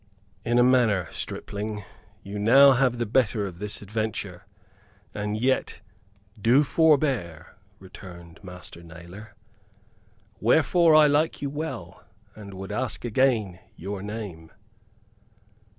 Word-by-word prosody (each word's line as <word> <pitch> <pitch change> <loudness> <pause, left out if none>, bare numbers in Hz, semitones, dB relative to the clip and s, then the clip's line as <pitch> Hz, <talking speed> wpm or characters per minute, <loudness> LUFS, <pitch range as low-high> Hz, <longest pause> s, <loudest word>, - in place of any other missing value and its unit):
"In 120 +3 +1
a 120 - +6
manner, 115 -9 +3
stripling, 105 0 -6 0.4
you 100 +1 -7 0.3
have 130 -1 +2
now - - -8
the 120 - -1
better 110 -2 +1
of 90 -3 -8
this 105 0 -5
adventure, 100 -3 -5 0.7
and 105 +1 -3
yet 130 -3 -1 0.6
do 125 +7 +4
forbear," 135 - +1 0.2
returned 90 -2 -13
Master 90 -2 -11
Nailor. 85 +6 -12 1.0
"Wherefore 160 - +4
I 155 0 +7
like 150 +1 +1
you 140 - -2
well, 145 - -6 0.3
and 100 -2 -10
would 95 +2 -7
ask 125 +3 -3
again 115 -6 +1 0.2
your 95 +3 -6
name." 100 -6 -7
105 Hz, 115 wpm, -25 LUFS, 95-130 Hz, 1.0 s, I